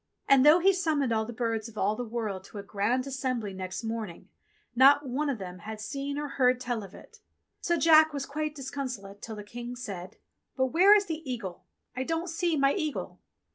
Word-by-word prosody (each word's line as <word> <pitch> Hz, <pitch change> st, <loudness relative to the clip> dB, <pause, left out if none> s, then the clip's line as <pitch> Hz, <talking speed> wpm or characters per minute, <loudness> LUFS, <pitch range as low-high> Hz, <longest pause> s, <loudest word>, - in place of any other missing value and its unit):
And 275 Hz, -1 st, +6 dB
though 300 Hz, +3 st, +8 dB
he 385 Hz, +2 st, +4 dB
summoned 305 Hz, -9 st, 0 dB
all 220 Hz, 0 st, +1 dB
the 235 Hz, -, -6 dB
birds 230 Hz, -1 st, -2 dB
of 220 Hz, -2 st, -14 dB
all 205 Hz, +2 st, +1 dB
the 245 Hz, -, -4 dB
world 215 Hz, -5 st, -4 dB
to 210 Hz, -, -11 dB
a 200 Hz, -, -5 dB
Grand 210 Hz, +6 st, 0 dB
Assembly 255 Hz, -6 st, -3 dB
next 185 Hz, +2 st, -5 dB
morn 225 Hz, -2 st, -3 dB
ing, 170 Hz, -, -14 dB, 0.5 s
not 275 Hz, +3 st, +6 dB
one 285 Hz, +4 st, -1 dB
of 270 Hz, -, -1 dB
them 180 Hz, -2 st, -8 dB
had 215 Hz, +3 st, -7 dB
seen 275 Hz, +6 st, -4 dB
or 295 Hz, 0 st, -2 dB
heard 255 Hz, -2 st, +2 dB
tell 245 Hz, -3 st, -2 dB
of 195 Hz, -2 st, -11 dB
it. -, -, -15 dB, 0.4 s
So 345 Hz, -1 st, 0 dB
Jack 315 Hz, 0 st, +6 dB
was 280 Hz, -2 st, -4 dB
quite 305 Hz, +1 st, -3 dB
disconsolate 255 Hz, -8 st, -6 dB
till 225 Hz, -, -6 dB
the 210 Hz, -, -7 dB
King 240 Hz, +3 st, -7 dB
said, 195 Hz, -7 st, -7 dB, 0.4 s
"But 260 Hz, 0 st, +1 dB
where 385 Hz, +5 st, +7 dB
is 410 Hz, -1 st, +3 dB
the 320 Hz, -3 st, -4 dB
eagle? 190 Hz, -7 st, -6 dB, 0.3 s
I 255 Hz, -, -2 dB
don't 330 Hz, +5 st, -2 dB
see 335 Hz, -1 st, 0 dB
my 275 Hz, 0 st, +3 dB
eagle." 310 Hz, -6 st, -3 dB
255 Hz, 215 wpm, -28 LUFS, 215-290 Hz, 0.5 s, though